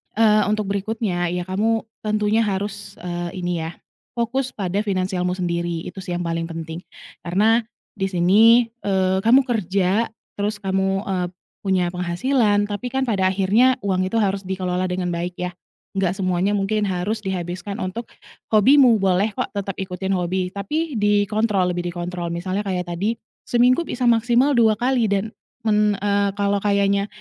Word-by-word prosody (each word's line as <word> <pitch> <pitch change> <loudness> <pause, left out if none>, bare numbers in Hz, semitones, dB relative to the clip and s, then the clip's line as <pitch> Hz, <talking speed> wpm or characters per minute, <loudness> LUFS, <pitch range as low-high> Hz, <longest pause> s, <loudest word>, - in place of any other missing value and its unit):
eee, 215 -1 +4
untuk 210 -1 -1
berikutnya 200 -3 -1
ya, 180 0 -2
kamu 220 +4 0 0.2
tentunya 215 +1 +2
harus, 200 0 -4
eee, 175 +1 -4
ini 175 -1 -1
ya 165 - -6 0.4
fokus 250 +3 -1
pada 195 -1 -1
finansialmu 185 -2 -1
sendiri 170 -2 -2
itu 190 - -10
sih 180 - -4
yang 175 - -2
paling 165 0 -2
penting, 165 0 -6 0.5
karena 215 +7 +3 0.3
di 195 - 0
sini, 210 +6 +5 0.2
eee, 190 -1 +2
kamu 255 +4 +6
kerja, 200 -1 +1 0.3
terus 205 +1 -2
kamu, 195 0 0
eee, 185 -2 -1 0.4
punya 185 -2 +1
penghasilan, 205 +4 +1
tapi 205 +5 -4
kan 265 0 +1
pada 200 -7 +1
akhirnya 200 +7 +3
uang 185 -2 +1
itu 190 - -4
harus 195 -1 0
dikelola 185 -1 -1
dengan 180 -1 -2
baik 175 +1 -3
ya, 180 0 -2 0.5
nggak 185 -2 +1
semuanya 185 0 0
mungkin 205 +1 0
harus 190 +4 -1
dihabiskan 185 +1 -4
untuk 220 +6 -5 0.5
hobimu, 245 +1 +6
boleh 195 +2 +2
kok 255 - -2
tetap 200 -1 -3
ikutin 190 0 -3
hobi, 180 +1 -1
tapi 300 +11 -2
dikontrol, 205 -2 +2
lebih 175 0 -3
dikontrol. 175 0 -4
Misalnya 185 +4 -2
kayak 180 -2 -2
tadi 200 +7 -1 0.3
seminggu 245 +5 +4
bisa 250 0 -2
maksimal 240 +4 +3
2 225 -2 +4
kali 245 -3 +2
dan 200 +2 0 0.4
men 210 -1 +3
eee, 200 0 +1
kalau 200 0 +2
kayaknya 200 -1 +2
195 Hz, 155 wpm, -22 LUFS, 180-215 Hz, 0.5 s, kamu